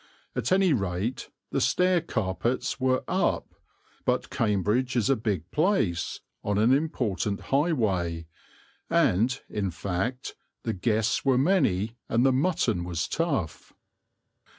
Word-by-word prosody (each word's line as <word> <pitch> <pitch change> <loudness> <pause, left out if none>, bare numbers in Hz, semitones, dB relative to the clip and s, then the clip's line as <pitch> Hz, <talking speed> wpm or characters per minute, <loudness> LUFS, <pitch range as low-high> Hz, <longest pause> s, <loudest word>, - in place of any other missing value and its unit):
At - - -1
any 185 -3 +4
rate, 100 +2 -2 0.2
the - - 0
stair 180 -1 +3
carpets 125 - -2
were 130 0 +1
"up"; - - 0 0.5
but - - 0
Cambridge 110 +5 +1
is 120 +2 +2
a - - +4
big 100 -7 -3
place, 150 - 0 0.2
on 105 -1 0
an 115 +5 +4
important 120 -9 0
highway, 100 - 0 0.6
and, 120 +8 +2
in 100 -3 -2
fact, 100 +8 -3 0.3
the - - -1
guests 110 +3 0
were 135 -2 +3
many 125 - +2
and 115 +3 +3
the 135 - +4
mutton 130 - +1
was 85 -1 -2
tough. 140 - -2
115 Hz, 125 wpm, -27 LUFS, 95-135 Hz, 0.6 s, any